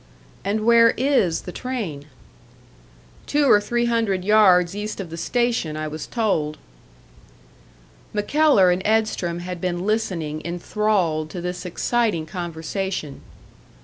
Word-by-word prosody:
"And 215 Hz, +2 st, -1 dB
where 230 Hz, 0 st, +6 dB
is 255 Hz, -, +2 dB
the 180 Hz, -, -8 dB
train?" 200 Hz, -, -5 dB, 1.2 s
"Two 290 Hz, 0 st, +2 dB
or 210 Hz, -6 st, +6 dB
three 240 Hz, +3 st, 0 dB
hundred 225 Hz, -6 st, 0 dB
yards 195 Hz, -4 st, +5 dB
east 210 Hz, +1 st, -5 dB
of 180 Hz, -4 st, -6 dB
the -, -, -5 dB
station, 230 Hz, -5 st, -1 dB
I 155 Hz, 0 st, -3 dB
was 155 Hz, +1 st, -6 dB
told." 165 Hz, -10 st, -1 dB, 1.5 s
MacKellar 210 Hz, -2 st, +3 dB
and 180 Hz, +1 st, 0 dB
Edstrom 210 Hz, -6 st, 0 dB
had 180 Hz, -1 st, -6 dB
been 180 Hz, 0 st, -2 dB
listening 175 Hz, -8 st, -2 dB
enthralled 175 Hz, -3 st, -1 dB
to 180 Hz, -, -6 dB
this 180 Hz, +1 st, -5 dB
exciting 215 Hz, -2 st, 0 dB
conversation. 175 Hz, -2 st, -5 dB
190 Hz, 120 wpm, -22 LUFS, 170-220 Hz, 1.5 s, where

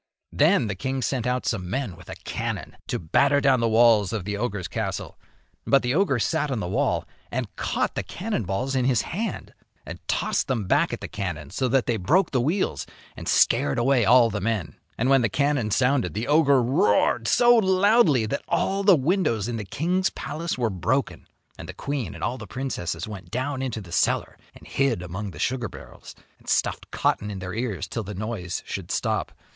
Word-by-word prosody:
Then -, -, +3 dB
the 105 Hz, -, -2 dB
king 130 Hz, +6 st, -3 dB
sent 125 Hz, -2 st, -1 dB
out 125 Hz, 0 st, -1 dB
some 90 Hz, -6 st, -2 dB
men 120 Hz, -4 st, -3 dB
with 90 Hz, 0 st, -15 dB
a -, -, -6 dB
cannon -, -, -4 dB
to -, -, -1 dB
batter 115 Hz, -, +3 dB
down 135 Hz, -3 st, +3 dB
the 115 Hz, 0 st, +1 dB
walls 110 Hz, -3 st, +5 dB
of 110 Hz, -5 st, -3 dB
the 105 Hz, 0 st, -2 dB
ogre's 100 Hz, -4 st, -3 dB
castle. -, -, -4 dB, 0.5 s
But 135 Hz, -1 st, +4 dB
the 125 Hz, +1 st, 0 dB
ogre 165 Hz, -6 st, +2 dB
sat 150 Hz, +5 st, 0 dB
on 130 Hz, -4 st, -1 dB
the 90 Hz, -, -3 dB
wall 90 Hz, -, 0 dB, 0.2 s
and -, -, -4 dB
caught -, -, -1 dB
the -, -, -2 dB
cannon 210 Hz, -, -3 dB
balls 100 Hz, +9 st, -2 dB
in 130 Hz, -1 st, +1 dB
his 125 Hz, -3 st, +2 dB
hand 210 Hz, +5 st, -4 dB, 0.3 s
and -, -, -8 dB
tossed -, -, 0 dB
them 120 Hz, -6 st, -1 dB
back -, -, +2 dB
at -, -, -5 dB
the -, -, -5 dB
cannon, 85 Hz, -8 st, -5 dB
so 130 Hz, +7 st, 0 dB
that 130 Hz, 0 st, +2 dB
they 120 Hz, -, 0 dB
broke 165 Hz, -, +2 dB
the 130 Hz, -, +1 dB
wheels 170 Hz, +10 st, -1 dB, 0.3 s
and -, -, -6 dB
scared 70 Hz, -, +3 dB
away 125 Hz, 0 st, +3 dB
all 115 Hz, +2 st, +5 dB
the 100 Hz, -1 st, -3 dB
men. 110 Hz, -4 st, -2 dB, 0.2 s
And 125 Hz, -, 0 dB
when 135 Hz, -1 st, +5 dB
the 115 Hz, -, +1 dB
cannon 140 Hz, -2 st, +1 dB
sounded 125 Hz, -, +1 dB
the 110 Hz, -, -2 dB
ogre 140 Hz, -4 st, +4 dB
roared 115 Hz, -2 st, +2 dB
so 240 Hz, 0 st, +5 dB
loudly 190 Hz, -, +4 dB
that 140 Hz, +6 st, -2 dB
all 190 Hz, +3 st, 0 dB
the 195 Hz, -2 st, +6 dB
windows 140 Hz, -, +1 dB
in 120 Hz, -1 st, -3 dB
the 105 Hz, -, -5 dB
king's 180 Hz, -, 0 dB
palace 150 Hz, +4 st, -4 dB
were 120 Hz, -3 st, 0 dB
broken, 95 Hz, +10 st, -1 dB, 0.3 s
and -, -, -8 dB
the -, -, -7 dB
queen 140 Hz, -, -4 dB
and -, -, -8 dB
all 125 Hz, +6 st, -2 dB
the 110 Hz, -, -8 dB
princesses 90 Hz, -10 st, -4 dB
went 100 Hz, -2 st, -9 dB
down 130 Hz, +3 st, -2 dB
into 120 Hz, -5 st, -3 dB
the 90 Hz, -4 st, -12 dB
cellar -, -, +1 dB, 0.2 s
and -, -, -15 dB
hid 130 Hz, -9 st, 0 dB
among 95 Hz, +4 st, -5 dB
the 80 Hz, -, -11 dB
sugar 125 Hz, -, -1 dB
barrels, -, -, -12 dB, 0.2 s
and -, -, -11 dB
stuffed -, -, 0 dB
cotton 105 Hz, -, 0 dB
in 100 Hz, -, -5 dB
their 90 Hz, -1 st, -6 dB
ears 105 Hz, -5 st, -3 dB
till 115 Hz, -, -4 dB
the 105 Hz, -1 st, -7 dB
noise 100 Hz, -3 st, -4 dB
should -, -, -6 dB
stop. -, -, -1 dB
120 Hz, 205 wpm, -25 LUFS, 105-140 Hz, 0.5 s, the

